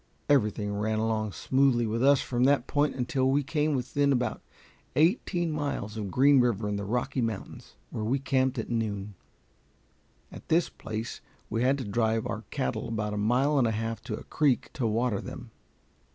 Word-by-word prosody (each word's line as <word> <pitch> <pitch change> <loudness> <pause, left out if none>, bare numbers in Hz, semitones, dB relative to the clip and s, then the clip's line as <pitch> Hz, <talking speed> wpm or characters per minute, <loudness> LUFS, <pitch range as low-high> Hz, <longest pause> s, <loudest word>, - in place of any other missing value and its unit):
Everything 105 -6 +2
ran 110 +1 -1
along 110 -1 0
smoothly 130 +1 +2
with 115 +1 -1
us 140 0 +5
from 120 -1 -1
that 140 -2 +3
point 145 +1 +1
until 130 +1 0
we 140 +2 +2
came 150 +1 0
within 140 +3 +1
about 125 -2 0 0.5
eighteen 170 +1 +2
miles 145 -8 -3
of 105 -3 -4
Green 135 +6 +5
River, 115 -4 +1
in 105 - -1
the 100 - -3
Rocky 125 +4 -1
Mountains, 110 -4 -5 0.2
where 110 - -3
we 120 +6 +1
camped 130 -1 0
at - - -4
noon. 105 -3 -2 1.2
At - - -11
this 170 +1 +3
place 110 +1 -6 0.3
we 115 - 0
had 130 +3 +3
to 135 - -4
drive 110 +1 0
our - - -4
cattle 65 - -2
about 105 -2 -2
a - - -3 0.2
mile 140 +3 +3
and 120 - +3
a - - +1
half 115 +1 -3
to 110 -4 -3
a - - -9
creek 145 -5 +1
to 125 -6 -1
water 110 -1 0
them. - - -9
120 Hz, 180 wpm, -28 LUFS, 110-140 Hz, 1.2 s, us